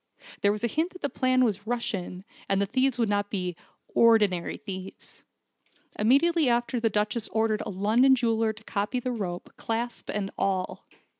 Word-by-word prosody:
There 200 - +4
was 210 +1 -4
a - - +3
hint 320 - -1
that 365 - -13
the 285 - -1
plan 255 -1 +2
was 205 -2 -2
Russian, 195 -6 -3 0.3
and 195 0 +2
the 200 - +2
thieves 260 +4 +1
would 230 -2 +2
not 205 0 0
be 180 -3 -2 0.4
'ordinary 210 -7 +3
thieves.' 195 -3 -9 0.8
Immediately 280 +7 +4
after 240 +1 +1
the 225 -1 +2
Duchess 210 +2 0
ordered 220 -1 0
a - - -3
London 220 +8 +4
jeweller 225 -3 +1
to 220 +1 -14
copy 210 +4 -2
the 250 +1 -3
rope, 185 -7 -4
clasp 235 +1 -3
and 200 -2 -3
all. 190 -2 -1
220 Hz, 170 wpm, -27 LUFS, 200-245 Hz, 0.8 s, There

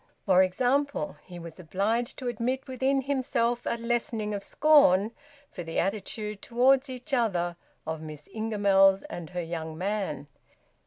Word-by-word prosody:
For 185 -3 +6
example, 250 - 0
he 180 -1 -10
was 170 0 -9
obliged 205 +8 -1
to 255 - -5
admit 245 +3 -1
within 265 +1 0
himself 250 -3 0
a 235 - 0
lessening 230 -2 -1
of 200 -1 -4
scorn 230 -10 +5 0.4
for 180 - -7
the 165 -1 -5
attitude 210 +1 -2
toward 260 +3 +3
each 255 +3 -7
other 180 -8 +1 0.3
of 160 0 -4
Miss 155 -2 -9
Ingamells 200 -3 +3
and 175 -3 -6
her 180 -1 -3
young 160 -1 -5
man. 195 -4 -2
215 Hz, 145 wpm, -28 LUFS, 180-250 Hz, 0.4 s, For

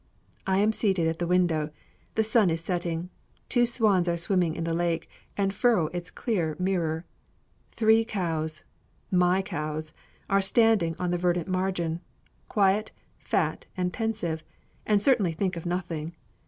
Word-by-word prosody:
I 190 0 +2
am 210 +2 +4
seated 195 -6 +1
at 160 0 -2
the 175 - -1
window. 170 -4 +2 0.5
The 220 - +3
sun 215 -3 +3
is 165 0 0
setting. 175 0 -3 0.4
Two 240 -1 +3
swans 205 -7 +2
are 170 - 0
swimming 170 -1 +1
in - - -3
the 165 0 -1
lake, 170 -1 0 0.3
and 195 -1 +1
furrow 210 -7 +3
its 175 -1 -4
clear 175 -10 -1
mirror. 175 -3 -1 0.7
Three 220 0 +4
cows 165 -8 -3 0.5
my 180 +1 +3
cows 155 -4 -4 0.3
are 195 0 +3
standing 200 -5 +3
on 180 -1 -1
the 175 - 0
verdant 175 -1 +1
margin, 185 -3 -1 0.5
quiet, 205 +1 +2 0.3
fat, - - -1
and 180 -1 -1
pensive, 210 -9 -2 0.4
and 210 -2 +3
certainly 215 -11 +3
think 185 +2 -1
of 170 0 -5
nothing. 170 -2 -3
180 Hz, 150 wpm, -27 LUFS, 165-200 Hz, 0.7 s, am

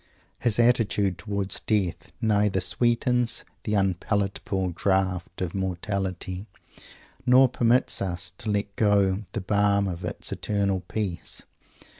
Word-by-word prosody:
His 115 -3 +2
attitude 105 -6 +2
towards 100 0 -3
death 100 -6 -1
neither 105 -3 +2
sweetens 120 +2 +1 0.2
"the 105 - 0
unpalatable 95 0 0
draught 95 0 0
of 90 -2 -2
mortality" 95 0 -3 0.8
nor 130 +1 +6
permits 120 0 +2
us 90 -1 -3
to 110 - -4
let 100 -1 -1
go 100 -1 +2
the 110 - -2
balm 100 0 +2
of 90 -1 -5
its - - -3
"eternal 100 -2 0
peace." 90 0 -3
100 Hz, 115 wpm, -26 LUFS, 95-110 Hz, 0.8 s, nor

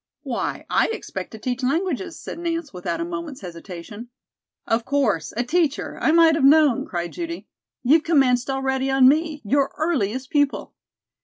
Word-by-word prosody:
"Why, - - -3
I - - +2
expect 450 - -5
to 220 - -10
teach 245 +3 -3
languages," 330 +5 -1
said - - -7
Nance 335 -4 -3
without 180 - -3
a 335 - -2
moment's 335 -6 -6
hesitation. 180 +5 -9 0.6
"Of 225 +1 0
course, 230 - 0
a 240 - +1
teacher. 305 +2 -1
I - - +3
might 330 0 +6
have 315 -3 0
known!" 290 -2 +5
cried 175 -1 -4
Judy. 335 -1 -5 0.4
"You've 295 +6 +5
commenced 270 -7 +2
already 270 0 -1
on 270 -1 +5
me 305 0 +1
your 275 +5 +2
earliest 260 - -1
pupil! 290 -2 0
275 Hz, 160 wpm, -23 LUFS, 245-325 Hz, 0.6 s, might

